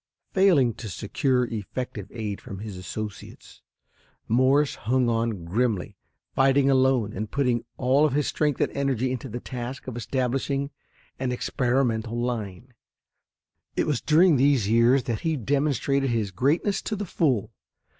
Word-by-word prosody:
Failing 170 -12 +4
to 110 - -5
secure 125 - 0
effective 110 -2 -5
aid 105 -4 -5
from 105 -6 -8
his 105 0 -7
associates, 100 +3 -8 0.7
Morse 130 +5 +3
hung 125 +2 0
on 115 -6 -1
grimly, 105 +1 -1 0.4
fighting 135 +1 +4
alone, 130 -5 +2
and 110 +2 -4
putting 125 -3 0
all 130 +3 +3
of 150 -4 +2
his 145 0 +1
strength 150 -3 0
and - - +1
energy 130 -3 0
into 130 +1 -4
the 120 +3 -5
task 125 +1 -6
of 130 - -6
establishing 135 +3 -1 0.5
an 130 -1 -1
experimental 120 -2 0
line. 120 -1 -4 1.0
It - - +1
was 145 -6 0
during 160 0 +5
these 135 -5 +3
years 115 +4 +4
that 115 -2 -2
he 160 -2 -1
demonstrated 140 +1 0
his 110 -4 -1
greatness 150 - +1
to 215 - -3
the 205 0 -4
full. 135 - 0
125 Hz, 145 wpm, -25 LUFS, 115-140 Hz, 1.0 s, during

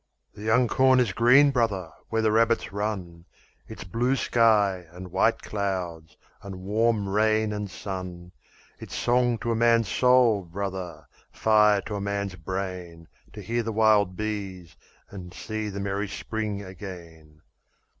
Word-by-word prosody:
"The - - -12
young 110 +3 +3
corn 130 +2 +4
is 115 -6 +1
green, 130 +6 +5
brother, 100 - -1 0.2
where 110 0 0
the 110 - +3
rabbits 115 -1 +1
run. 95 -5 -4 0.4
It's - - -9
blue 120 +8 0
sky, 105 -8 +2
and 90 +1 -10
white - - +1
clouds, 90 -6 -4 0.2
and 95 -3 -8
warm 110 +1 +1
rain 110 +1 +1
and 105 -1 -4
sun. 90 -2 -7 0.5
It's - - -8
song 120 -1 +2
to 120 - -1
a - - +1
man's 115 -2 +3
soul, 125 -6 +3
brother, 95 0 -6 0.2
fire 105 -2 +3
to 105 +1 -5
a - - -4
man's 100 -1 -3
brain, 90 -2 -6 0.2
To - - -9
hear 120 +1 -1
the 115 0 -3
wild 105 -4 +3
bees 95 -5 -5 0.4
and 90 -3 -10
see 110 -1 -4
the 100 0 -6
merry 100 +1 -2
spring 105 0 -4
again. 85 -5 -11
100 Hz, 145 wpm, -26 LUFS, 95-110 Hz, 0.5 s, green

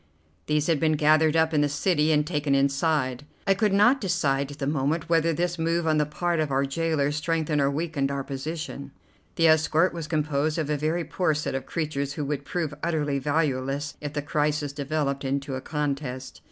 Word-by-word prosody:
These 150 -1 +1
had 165 -3 +2
been 155 0 +2
gathered 155 +1 +4
up 160 0 +3
in 150 - +3
the 145 - +2
city 155 +1 +1
and 150 -1 +3
taken 145 -4 0
inside. 140 -1 +1 0.2
I 195 - +4
could 210 +1 +1
not 240 +8 +4
decide 145 -8 0
at 145 - -10
the 140 - -3
moment 150 +3 -1
whether 165 0 +3
this 175 +1 -1
move 165 +1 0
on 155 -1 +2
the 150 - +1
part 170 +2 -1
of 155 -2 0
our 135 0 +1
gaolers 150 0 0
strengthened 155 -1 0
or 140 - +3
weakened 145 -1 -1
our 140 -1 -2
position. 140 0 -6 0.4
The 165 - +4
escort 160 +2 +3
was 165 -3 -5
composed 155 -1 0
of 155 -2 -1
a - - +2
very 155 +4 -1
poor 165 -2 0
set 150 - -2
of 135 - -4
creatures 145 -4 -2
who 150 - -3
would 145 0 -3
prove 160 -1 -2
utterly 150 -4 0
valueless 140 -1 -1
if 145 -1 -5
the 145 -1 -2
crisis 150 -1 -1
developed 140 -1 -2
into 140 +1 -2
a 130 - -3
contest. 140 -3 -4
150 Hz, 200 wpm, -26 LUFS, 140-160 Hz, 0.4 s, gathered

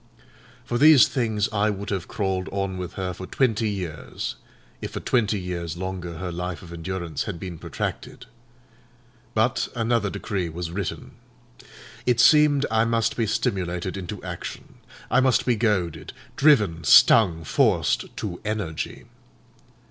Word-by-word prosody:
For 120 - -2
these 150 -2 +8
things 110 -6 0
I 105 +1 +2
would 100 0 -4
have 95 -3 -2
crawled 95 -2 -2
on 100 -1 -2
with 90 -1 -5
her 95 -1 -3
for 95 +1 -8
twenty 115 -4 +1
years, 90 -7 -5 0.5
if - - -6
for - - -3
twenty 110 -4 +1
years 85 -2 -4
longer 90 -2 -5
her 90 +1 -4
life 90 +1 -5
of 85 -1 -10
endurance 85 -2 -4
had 85 - -5
been 90 -3 -7
protracted. - - -5 1.1
But 120 +4 +1
another 115 -2 +1
decree 100 -3 -3
was 85 +1 -5
written. 95 +1 -4 1.0
It 120 -1 +3
seemed 150 0 +5
I 110 0 +3
must 115 -1 +1
be 115 -2 0
stimulated 95 -5 -2
into 95 +1 -6
action. 90 -2 -7 0.3
I - - +5
must 130 -1 +3
be 125 - +2
goaded, 105 -7 -1 0.2
driven, 105 - +3
stung, 85 -8 +6
forced - - +2
to 90 -5 -5
energy. 100 -7 -4
95 Hz, 140 wpm, -24 LUFS, 90-110 Hz, 1.1 s, these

